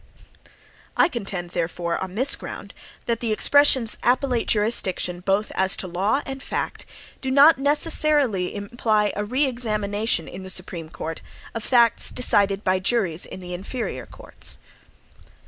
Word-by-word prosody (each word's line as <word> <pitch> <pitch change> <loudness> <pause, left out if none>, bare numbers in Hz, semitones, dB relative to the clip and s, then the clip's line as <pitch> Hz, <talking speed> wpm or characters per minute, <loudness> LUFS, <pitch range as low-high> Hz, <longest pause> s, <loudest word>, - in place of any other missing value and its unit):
I - - +5
contend, 195 - -5
therefore, 170 0 -2
on 190 0 -6
this 260 +5 +4
ground, - - -9 0.3
that 230 -1 -1
the 230 -2 -2
expressions, 260 0 +4
"appellate 250 -1 +1
jurisdiction, 200 -5 0
both 195 +3 0
as 190 0 +1
to 185 - -4
law 200 +10 0
and 270 0 -6
fact," - - -4 0.3
do 265 - -3
not 280 +3 +6
necessarily 285 - +2
imply 210 0 0
a 205 - -2
re 255 +7 +1
examination 215 -7 -1
in 185 - -8
the 190 - -8
Supreme 175 -3 -3
Court 165 0 -6 0.3
of 230 - -5
facts 235 -3 +3
decided 200 -4 +2
by 185 0 +1
juries 190 -5 0
in 185 - -9
the 180 0 -7
inferior 190 - -5
courts. - - -5
210 Hz, 145 wpm, -23 LUFS, 185-250 Hz, 0.3 s, not